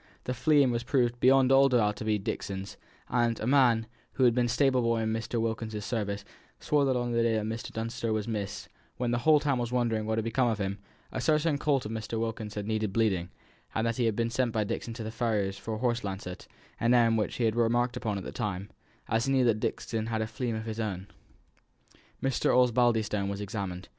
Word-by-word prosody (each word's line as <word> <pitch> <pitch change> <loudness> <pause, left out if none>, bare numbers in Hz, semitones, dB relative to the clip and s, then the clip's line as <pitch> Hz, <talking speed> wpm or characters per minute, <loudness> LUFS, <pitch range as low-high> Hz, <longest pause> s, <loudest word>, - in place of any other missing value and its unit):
The 125 - -2
fleam 135 +1 +3
was 120 0 -1
proved 120 -2 +1
beyond 130 +1 +5
all 135 +1 +6
doubt 110 -5 +2
to - - -5
be 110 -1 +1
Dixon's; 95 -1 -5 0.3
and 120 -2 +1
a - - -3
man, 120 -4 +4 0.3
who 130 - +1
had 120 -2 +6
been 120 0 +2
stable 130 +1 +2
boy 115 -1 +1
in 110 0 0
Mr. 115 +1 -2
Wilkins's 110 -2 -3
service, 100 -3 -3 0.3
swore 145 -2 +2
that 130 -1 +1
on 120 -1 -1
the 115 0 +2
day 115 -1 +2
when 110 0 -2
Mr. 115 +1 -5
Dunster 115 +1 -3
was 110 -1 -1
missed, 105 -3 -4
and - - -28 0.2
when 125 -1 -1
the 120 - +1
whole 155 +4 +5
town 140 -4 0
was 120 -1 -2
wondering 115 -3 0
what 110 0 0
had 110 - -1
become 120 +2 +1
of 115 -3 0
him, 100 -1 -3 0.3
a - - -3
certain 155 -1 +2
colt 140 -5 +1
of 105 - -4
Mr. 110 0 -3
Wilkins's 110 -2 -4
had 105 -1 -3
needed 110 -1 -1
bleeding, 95 -5 +1 0.5
and 110 - +1
that 115 -1 -1
he 120 - +1
had 110 -2 +1
been 115 +1 0
sent 125 0 +1
by 110 -1 0
Dixon 115 +3 -4
to 115 - -5
the 110 - -5
farrier's 105 -4 -1
for 110 +2 -4
a - - -4
horse 120 0 0
lancet, 95 -2 -6 0.3
an 120 +1 +3
errand 115 -2 +4
which 105 - -2
he 120 - -1
had 110 -1 +2
remarked 120 +2 +2
upon 110 -5 -2
at 95 - -5
the - - -6
time, 100 -1 -4 0.4
as 115 +2 +1
he 135 - 0
knew 130 -2 +4
that 110 -3 +2
Dixon 110 0 -2
had 110 -1 -1
a - - -1
fleam 120 +1 -3
of 110 0 -4
his 110 0 -5
own. 100 -3 -3 1.1
Mr. 135 -1 +2
Osbaldistone 115 -5 +2
was 100 0 -4
examined. 100 -3 -5
115 Hz, 235 wpm, -29 LUFS, 110-125 Hz, 1.1 s, all